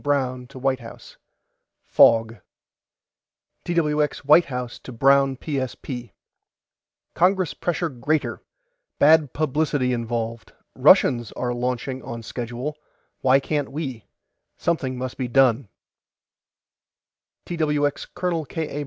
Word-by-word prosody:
BROWN 130 -3 -1
TO 135 - -13
WHITE 130 0 0
HOUSE: 115 -1 -12 0.7
FOG 115 0 +4 1.3
TWX 150 -3 +1
WHITE 155 +4 +6
HOUSE 125 -2 -5
TO - - -10
BROWN 135 +2 +3
PSP: 130 - -5 1.0
CONGRESS 185 0 +2
PRESSURE 175 -1 -2
GREATER 145 +3 -2 0.6
BAD 150 -2 +5
PUBLICITY 145 -3 0
INVOLVED 115 -1 -4 0.2
RUSSIANS 120 -3 +4
ARE 120 -1 -2
LAUNCHING 125 +2 -3
ON 115 -1 -7
SCHEDULE 120 +6 -5 0.5
WHY 135 +1 +5
CAN'T 145 0 -2
WE 135 -7 -5 0.5
SOMETHING 135 -7 -1
MUST 130 0 -5
BE 130 - -1
DONE 125 -2 +3 1.8
TWX 150 -4 -1
COL. 170 -4 -1
K. 160 +3 -4
A. 145 - -5
135 Hz, 105 wpm, -23 LUFS, 120-150 Hz, 1.8 s, WHITE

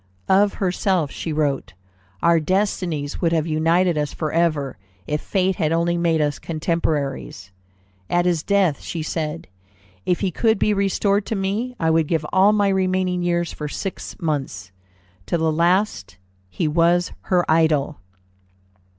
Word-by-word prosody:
Of 200 +1 +4
herself 185 -4 0
she 165 - -5
wrote, 145 -8 -1 0.5
"Our 170 -1 +5
destinies 170 -4 -1
would 170 - +2
have 160 -2 +1
united 165 +1 +2
us 150 -1 -3
forever, 155 - -1 0.3
if 150 0 -2
fate 190 -1 0
had 155 -3 0
only 170 +1 +1
made 170 -2 +1
us 145 -1 -1
contemporaries." 155 - -2 0.6
At 175 0 +2
his 175 -3 +1
death 190 -5 +1
she 165 -2 -5
said, 160 0 -4 0.6
"If 180 - 0
he 195 -3 0
could 220 +5 +2
be 210 - +2
restored 200 0 +1
to 225 - -1
me, 210 +6 -2
I 160 -1 +2
would 160 -1 +2
give 160 -2 0
all 190 +2 +5
my 205 -1 +2
remaining 185 -1 0
years 175 -1 0
for 150 - -5
six 190 +6 -6
months." 135 - -3 0.6
To 170 - +1
the 160 -1 +1
last 170 - +1 0.3
he 95 - -2
was 170 +3 +2
her 180 -2 +2
idol. 155 -2 +2
170 Hz, 150 wpm, -22 LUFS, 155-185 Hz, 0.6 s, Our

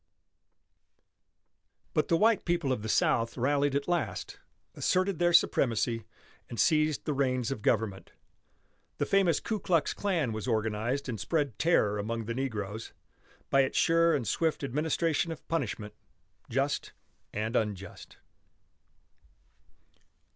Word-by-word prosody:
But - - +1
the 165 - +3
white 220 +2 +3
people 170 -6 0
of 125 - -1
the 110 - -5
South 115 +2 +2
rallied 140 +2 +1
at 140 - -1
last, 175 -3 -2 0.3
asserted 185 -1 0
their 175 0 +3
supremacy, 115 -7 +2 0.4
and 120 - -6
seized 155 -2 +2
the 150 - 0
reins 130 -3 0
of 120 - -4
government. 105 -3 0 0.9
The - - 0
famous 190 -6 +3
Ku 220 -2 -3
Klux 170 -4 +1
Klan 175 - 0
was 110 +2 -4
organized 110 +4 -1
and 115 -4 -4
spread 145 -9 -1
terror 110 -11 +2
among 115 +2 -3
the 115 - -3
negroes, 110 -4 -4 0.6
by 135 - +5
its 130 - -1
sure 165 0 +4
and 125 -6 -2
swift 160 +8 0
administration 160 +4 0
of 160 - -9
punishment 120 -9 -3 0.6
just 135 +3 -1 0.4
and 110 +3 -3
unjust. 105 -4 -3
135 Hz, 125 wpm, -29 LUFS, 115-165 Hz, 0.9 s, by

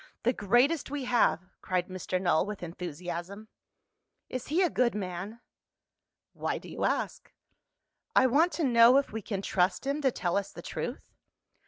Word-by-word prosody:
"The 245 - +3
greatest 245 - +2
we 285 -2 -4
have!" 185 -9 +2 0.2
cried 180 -1 -1
Mr. 185 0 -3
Null 175 -4 +2
with 210 -3 -6
enthusiasm. 175 +4 -6 0.8
"Is 255 -1 -5
he 335 +6 +2
a 355 - +3
good 245 -3 +2
man?" 195 +3 -5 0.9
"Why - - -2
do - - -11
you - - -3
ask?" - - -2 0.8
"I - - +6
want 300 +8 +4
to 315 - -2
know 240 -1 +6
if 280 - +1
we 220 - -3
can 195 -1 -4
trust 185 +6 +1
him 280 +2 -1
to 270 - +3
tell 180 -6 -1
us 200 - -2
the - - -10
truth?" - - -6
215 Hz, 165 wpm, -29 LUFS, 180-260 Hz, 0.9 s, I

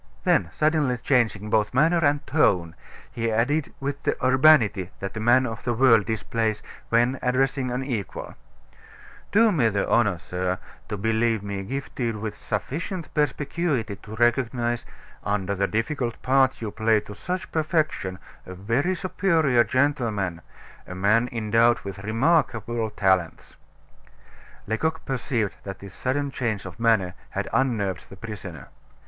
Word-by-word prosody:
Then, 85 - +2
suddenly 150 -5 +1
changing 110 -4 +1
both 110 +2 +1
manner 165 +5 +4
and 145 0 +2
tone, 90 - +2 0.4
he 115 -1 -2
added 135 +7 +1
with 140 +1 -3
the - - 0
urbanity 130 - +5
that 100 +1 -5
a - - -3
man 120 +4 +4
of 110 -3 -5
the 120 -1 -1
world 115 -4 +5
displays 110 -1 -1 0.3
when 120 +3 +2
addressing 130 +1 +1
an 125 +2 -2
equal: 120 -7 -4 1.0
"Do 225 +1 +5
me 130 - +3
the 100 -2 -1
honor, 105 -7 +3
sir, 90 +3 -3 0.3
to 105 - -3
believe 110 +1 +1
me 100 -1 -4
gifted 120 +1 -3
with 105 -1 -5
sufficient 155 - -4
perspicuity 145 -6 -1
to 110 +2 -10
recognize, 120 0 +1 0.4
under 100 -1 -1
the 100 0 0
difficult 120 +2 -2
part 130 -2 +2
you 105 - -3
play 110 0 +2
to 105 - -10
such 185 - -5
perfection, 155 - -1 0.3
a 95 - -7
very 120 - 0
superior 165 -9 +2
gentleman 110 - 0 0.5
a 90 - -7
man 105 +6 +2
endowed 115 +1 +3
with 100 -1 -7
remarkable 115 -2 +1
talents." 95 -5 0 1.1
Lecoq 160 +10 -2
perceived 125 -5 -1
that 100 -1 -6
this 100 0 -11
sudden 140 +2 -2
change 110 -7 -2
of 90 +1 -9
manner 110 -6 +2 0.2
had - - -3
unnerved 105 -9 0
the 95 - -11
prisoner. 95 - -8
115 Hz, 140 wpm, -25 LUFS, 105-135 Hz, 1.1 s, urbanity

